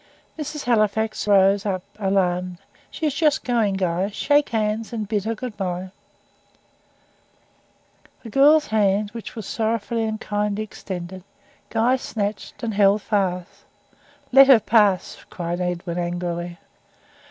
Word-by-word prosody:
Mrs. 300 -1 -5
Halifax 220 -2 +1
rose 200 0 +4
up, 185 -3 -2 0.2
alarmed. 180 -2 0 0.3
"She 320 - -5
is 300 - +1
just 300 0 +1
going, 225 -5 +1
Guy. 185 0 0
Shake 290 +7 +2
hands, 220 -1 -1
and 220 -3 -4
bid 205 -1 -1
her 225 +1 -1
good 245 -1 -6
bye." 185 -1 -4 2.3
The 225 - -9
girl's 295 +5 +5
hand, 205 -1 +1
which 230 0 -8
was 220 -3 -6
sorrowfully 225 +1 -1
and 220 0 -3
kindly 210 0 -2
extended, 185 -3 -7 0.5
Guy 235 +3 +2
snatched 210 -1 -5
and 225 -2 -2
held 200 0 +3
fast. 185 -4 -2 0.7
"Let 270 +1 +8
her 265 -4 +8
pass," 210 -5 +2
cried 175 0 -4
Edwin, 180 0 -3
angrily. 175 0 -3
210 Hz, 130 wpm, -22 LUFS, 185-225 Hz, 2.3 s, Let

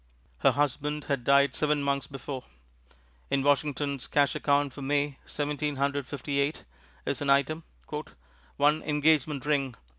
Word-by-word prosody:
Her - - +4
husband 145 +1 0
had 140 -4 -1
died 140 +2 +4
seven 150 -1 +1
months 140 -1 0
before. 135 -1 -6 0.8
In 135 0 +1
Washington's 140 -2 +1
cash 145 -1 +3
account 145 -2 +1
for 140 - -9
May, 145 0 0
Seventeen 150 0 -2
Hundred 140 0 -1
Fifty 140 0 -3
eight, 140 +3 0 0.4
is - - -2
an 145 - -1
item, 140 +4 +2 0.9
"one 150 +2 +3
Engagement 150 -2 +2
Ring 140 -4 +1
£2. - - -18
145 Hz, 145 wpm, -28 LUFS, 140-150 Hz, 0.9 s, Her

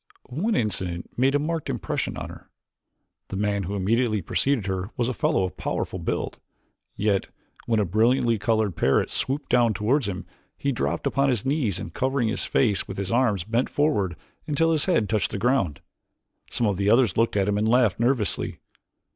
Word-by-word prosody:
One 190 - 0
incident 90 -5 -2
made 135 +3 +2
a - - +6
marked 160 +2 -2
impression - - -2
on - - -6
her. - - -13 0.8
The - - -6
man 100 0 0
who 100 +2 -4
immediately 110 +3 +1
preceded 135 - 0
her 95 0 -2
was 120 -2 +1
a 130 - -1
fellow 95 - +1
of 90 - -4
powerful - - -3
build, - - -3 0.6
yet, 100 -1 +1 0.4
when 115 -2 +2
a 105 - +2
brilliantly 115 +4 +2
colored 110 -3 +1
parrot 70 - +2
swooped 140 +3 -2
downward 120 -3 +4
toward 120 +7 +1
him, 100 -2 -4 0.3
he 140 - 0
dropped 85 - -2
upon 135 0 +2
his 120 -4 0
knees 135 - 0
and - - -7
covering 130 -3 0
his - - -1
face 105 -7 +1
with - - -7
his 95 -1 -3
arms 115 -7 +2
bent 115 +6 0
forward 105 - +1 0.3
until 165 +2 +2
his 155 -3 +2
head 140 - +2
touched 105 -4 +1
the - - -4
ground. 100 - +1 0.7
Some 120 - 0
of 100 -3 +1
the 100 +1 +1
others 115 -3 +4
looked 115 -2 +2
at 100 -1 +2
him 105 0 +1
and 110 - +1
laughed 120 -5 +3
nervously. 120 -2 +1
110 Hz, 190 wpm, -25 LUFS, 100-130 Hz, 0.8 s, a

